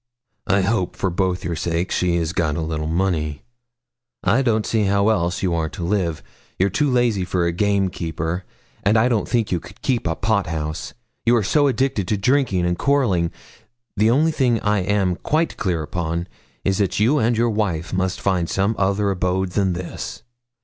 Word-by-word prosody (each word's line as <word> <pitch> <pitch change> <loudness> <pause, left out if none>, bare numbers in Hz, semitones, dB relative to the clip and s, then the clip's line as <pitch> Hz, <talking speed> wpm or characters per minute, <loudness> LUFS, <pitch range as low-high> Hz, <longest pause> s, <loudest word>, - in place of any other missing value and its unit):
'I 100 -1 +3
hope, 95 -1 0
for 95 - -1
both 90 0 -1
your 85 0 -2
sakes, 85 +3 -1
she 90 -1 +1
has 85 -1 -1
got 85 -5 0
a 80 - -2
little 80 -1 -2
money. 80 -3 -1 0.8
I 135 - +3
don't 110 -4 +1
see 110 -2 +1
how 100 -2 +2
you 90 0 -1
are 80 -2 0
to 85 - -7
live 95 0 +1
else. 80 -2 -6 0.3
You're 95 +1 +2
too 145 +6 +1
lazy 120 -6 +2
for 90 -1 0
a 85 - +1
game 100 +2 +1
keeper; 85 +1 -3 0.4
and 105 +3 +3
I 110 +3 +4
don't 115 -4 0
think 115 -3 0
you 90 - +1
could - - -14
keep 125 -8 0
a 80 - 0
pot 100 -1 0
house, 80 -1 -4 0.3
you 120 - +4
are 115 - +2
so 145 +8 +3
addicted 130 -6 0
to 105 - +1
drinking 115 -5 +2
and 90 0 -1
quarrelling. 115 -13 +2 0.7
The 105 +2 +3
only 150 +7 +3
thing 125 -7 +2
I 105 0 +2
am 95 -1 +1
quite 160 +2 0
clear 85 -5 -1
upon 85 +2 -3 0.4
is, 95 +1 +1
that 100 -2 0
you 125 +8 +3
and 115 -1 +2
your 120 0 +2
wife 90 -7 -1
must 95 0 -1
find 90 -4 0
some 100 +3 +1
other 100 +1 +1
abode 90 0 -1
than 95 -1 +1
this. 85 +4 -6
95 Hz, 195 wpm, -21 LUFS, 85-110 Hz, 0.8 s, I